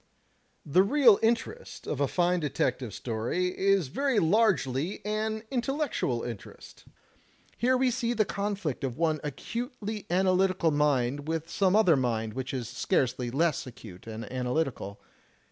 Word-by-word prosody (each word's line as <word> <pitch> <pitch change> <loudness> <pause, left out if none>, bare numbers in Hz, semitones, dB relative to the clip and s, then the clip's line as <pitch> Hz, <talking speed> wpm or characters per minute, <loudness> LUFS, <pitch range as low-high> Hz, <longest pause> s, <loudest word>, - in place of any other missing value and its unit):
"The 155 +5 +4
real 230 0 +5
interest 235 - -1
of 145 - -3
a 140 - +3
fine 180 +2 +1
detective 130 -5 -1
story 120 - -2
is 195 -6 +2
very 275 - 0
largely 175 - +1
an 215 +1 -2
intellectual 255 - -1
interest. 115 -4 -9 0.7
Here 255 +2 +2
we 255 0 +2
see 240 -1 -1
the 215 -3 +2
conflict 200 -9 -3
of 125 -3 -3
one 160 -2 +1
acutely 215 - -5
analytical 185 -1 +2
mind 145 -1 +1
with 165 +1 -3
some 190 +1 +2
other 210 -7 +5
mind 115 -4 -1
which 130 +2 -4
is 125 -4 -3
scarcely 120 0 0
less 150 +2 0
acute 110 -5 -12
and 110 0 -6
analytical. 125 -5 -2
170 Hz, 135 wpm, -28 LUFS, 130-215 Hz, 0.7 s, real